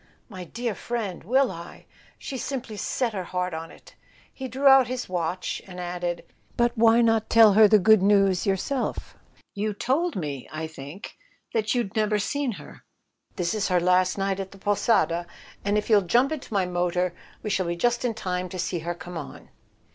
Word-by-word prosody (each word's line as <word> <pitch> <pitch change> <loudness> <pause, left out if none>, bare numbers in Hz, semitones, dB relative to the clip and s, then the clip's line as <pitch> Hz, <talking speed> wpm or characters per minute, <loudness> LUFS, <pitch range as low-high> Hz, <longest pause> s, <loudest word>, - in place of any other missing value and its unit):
"My 185 -4 -8
dear 235 +5 -3
friend—will 235 +4 -1
I? 170 +1 -10 0.3
She's 265 -3 -6
simply 255 -5 -5
set 230 +3 -1
her 190 -3 -4
heart 180 0 -2
on 165 +1 -5
it!" - - -16 0.4
He 265 - -6
drew 260 +3 -4
out 270 -2 +7
his 255 0 -4
watch 180 0 -3
and 180 -1 -9
added: 175 -1 -4 0.3
"But 240 0 +2
why 230 +1 +5
not 225 -1 +2
tell 225 -3 +7
her 215 +1 +7
the 215 +1 +6
good 215 +1 +5
news 195 -1 +3
yourself? 220 +8 -2 0.4
You 210 +1 -2
told 305 - 0
me, 145 -7 -5
I 155 +1 -4
think, 160 +4 -10 0.4
you'd 220 -1 0
never 215 -1 +2
seen 265 +4 -1
her? - - -12 0.5
This 175 -1 -1
is 215 -2 0
her 180 -2 +2
last 180 +2 +2
night 195 0 -1
at 195 -1 -4
the 195 - -14
'Posada,' 195 -4 +1 0.4
and 205 +1 +1
if 210 - -1
you'll 210 -3 +5
jump 240 - +2
into 310 -6 -6
my 195 -3 +1
motor 180 0 0 0.3
we 210 - -2
shall 185 -3 0
be 170 - -1
just 240 +7 +1
in 235 -3 -1
time 185 -3 -3
to 185 - -7
see 175 0 -2
her 170 +2 -4
come 175 0 -7
on." 145 - -10
200 Hz, 185 wpm, -25 LUFS, 180-230 Hz, 0.5 s, out